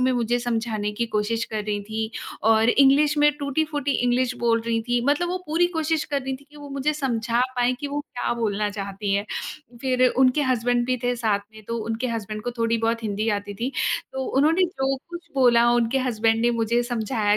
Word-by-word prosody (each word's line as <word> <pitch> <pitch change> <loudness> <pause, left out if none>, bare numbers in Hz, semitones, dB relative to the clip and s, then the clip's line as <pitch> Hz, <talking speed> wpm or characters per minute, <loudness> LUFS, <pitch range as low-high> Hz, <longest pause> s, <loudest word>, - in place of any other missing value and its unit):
में 255 +1 +3
मुझे 240 0 +1
समझाने 225 -3 -2
की 235 +2 -2
कोशिश 225 +2 0
कर 215 -1 -1
रही 210 -1 -2
थीं 220 +1 -3 0.4
और 225 +1 +4
इंग्लिश 280 +3 +5
में 295 0 +6
टूटी-फूटी 290 0 -1
इंग्लिश 245 0 +1
बोल 230 -1 +2
रही 230 -1 +1
थी। 245 0 +2
मतलब 295 +5 +2
वो 365 - -1
पूरी 330 +3 +2
कोशिश 320 0 0
कर 285 -2 -2
रही 265 0 -3
थी 280 - -20
कि 300 - -16
वो 290 -1 -9
मुझे 280 +2 0
समझा 240 -4 0 0.2
पाएँ 245 +1 +2
कि 290 - -3
वो 290 +1 -2
क्या 270 -5 -3
बोलना 210 -2 -1
चाहती 200 0 -4
हैं। 200 +1 0 0.6
फिर 255 -1 +3
उनके 260 +3 +3
हसबैंड 245 -2 +1
भी 255 0 +1
थे 245 - +2
साथ 220 -4 +1
में, 220 0 -13
तो 230 +2 -3
उनके 230 +3 -2
हसबैंड 215 -2 -4
को 245 - -2
थोड़ी 230 0 +1
बहुत 230 +1 0
हिंदी 215 +1 -1
आती 205 0 -8
थी, 245 +6 -3 0.4
तो 265 0 -3
उन्होंने 315 +7 +3
जो 270 -6 -1
कुछ 345 0 -8
बोला 240 -3 +5
उनके 240 +2 +2
हसबैंड 225 -3 +1
ने 240 - +4
मुझे 235 +2 +2
समझाया 220 -3 0
240 Hz, 205 wpm, -24 LUFS, 225-270 Hz, 0.6 s, में